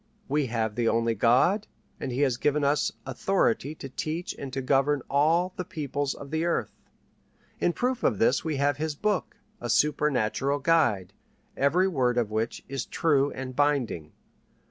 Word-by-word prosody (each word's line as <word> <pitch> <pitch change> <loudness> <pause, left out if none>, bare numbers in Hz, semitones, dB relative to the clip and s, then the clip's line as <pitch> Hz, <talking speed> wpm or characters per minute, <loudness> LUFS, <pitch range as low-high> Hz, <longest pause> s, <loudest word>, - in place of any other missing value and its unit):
We 145 0 +1
have 110 -2 -1
the 115 +1 0
only 115 0 +2
God, 130 - +3 0.3
and 130 - -4
he 125 +3 -1
has 130 -4 +2
given 150 +3 +1
us 145 +1 +2
authority 140 0 0
to 140 - -8
teach 155 +6 -4
and 135 - -7
to 130 - -3
govern 135 +1 +2
all 165 +6 +3
the 180 - -2
peoples 145 -4 -3
of 140 0 -10
the 160 +1 0
earth. 170 0 0 0.9
In 175 - +2
proof 250 +6 -1
of 105 - +2
this 125 +6 +2
we 160 -2 -2
have 140 0 +1
His 155 0 -2
Book, 210 +4 -1 0.2
a 120 - -5
supernatural 140 -1 +1
guide, 135 - +2 0.4
every 170 +7 +3
word 130 -8 +1
of 115 -3 0
which 110 +2 -2
is 135 -2 -4
true 145 -4 +2
and 130 -1 -6
binding. 135 - 0
140 Hz, 165 wpm, -27 LUFS, 125-155 Hz, 0.9 s, God